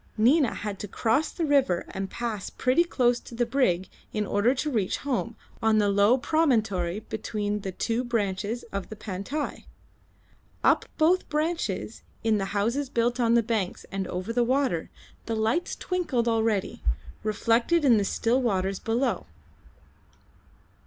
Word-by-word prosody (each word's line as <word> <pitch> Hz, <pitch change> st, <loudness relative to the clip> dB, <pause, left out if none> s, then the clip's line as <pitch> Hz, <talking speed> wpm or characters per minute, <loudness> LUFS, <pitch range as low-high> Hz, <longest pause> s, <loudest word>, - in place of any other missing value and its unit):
Nina 250 Hz, +3 st, +4 dB
had 205 Hz, -2 st, -5 dB
to 205 Hz, -, -5 dB
cross 230 Hz, +9 st, +1 dB
the 335 Hz, -, -2 dB
river 275 Hz, -, +2 dB
and 195 Hz, 0 st, -4 dB
pass 230 Hz, -5 st, -4 dB
pretty 260 Hz, +6 st, +2 dB
close 245 Hz, -8 st, +2 dB
to 235 Hz, -, -11 dB
the 240 Hz, +1 st, +1 dB
brig 210 Hz, -8 st, +1 dB, 0.2 s
in 210 Hz, -1 st, -1 dB
order 205 Hz, +6 st, +2 dB
to 300 Hz, +3 st, -2 dB
reach 210 Hz, -7 st, 0 dB
home 240 Hz, -4 st, -1 dB, 0.3 s
on 220 Hz, -1 st, +3 dB
the 205 Hz, -1 st, +3 dB
low 200 Hz, +5 st, +4 dB
promontory 220 Hz, -, +1 dB
between 210 Hz, -2 st, -3 dB
the 195 Hz, -2 st, -4 dB
two 230 Hz, +6 st, -1 dB
branches 220 Hz, -1 st, -1 dB
of 200 Hz, -1 st, -4 dB
the 215 Hz, -, -7 dB
Pantai. 210 Hz, +9 st, -4 dB, 1.0 s
Up -, -, +4 dB
both 345 Hz, +4 st, +3 dB
branches, 320 Hz, +3 st, -2 dB, 0.2 s
in 220 Hz, -2 st, +2 dB
the 195 Hz, -, -1 dB
houses 245 Hz, +7 st, 0 dB
built 240 Hz, +1 st, 0 dB
on 235 Hz, -1 st, +3 dB
the 235 Hz, -, +4 dB
banks 215 Hz, -5 st, -2 dB
and 195 Hz, -1 st, -2 dB
over 185 Hz, +5 st, -4 dB
the 240 Hz, 0 st, +3 dB
water, 255 Hz, -, 0 dB, 0.4 s
the 225 Hz, -, -1 dB
lights 225 Hz, +10 st, 0 dB
twinkled 320 Hz, -10 st, -1 dB
already, 225 Hz, -3 st, 0 dB, 0.4 s
reflected 230 Hz, +9 st, +2 dB
in 240 Hz, -5 st, +6 dB
the 205 Hz, -, +2 dB
still 235 Hz, +5 st, +1 dB
waters 195 Hz, -5 st, 0 dB
below. 235 Hz, +4 st, -1 dB
230 Hz, 150 wpm, -27 LUFS, 205-255 Hz, 1.0 s, in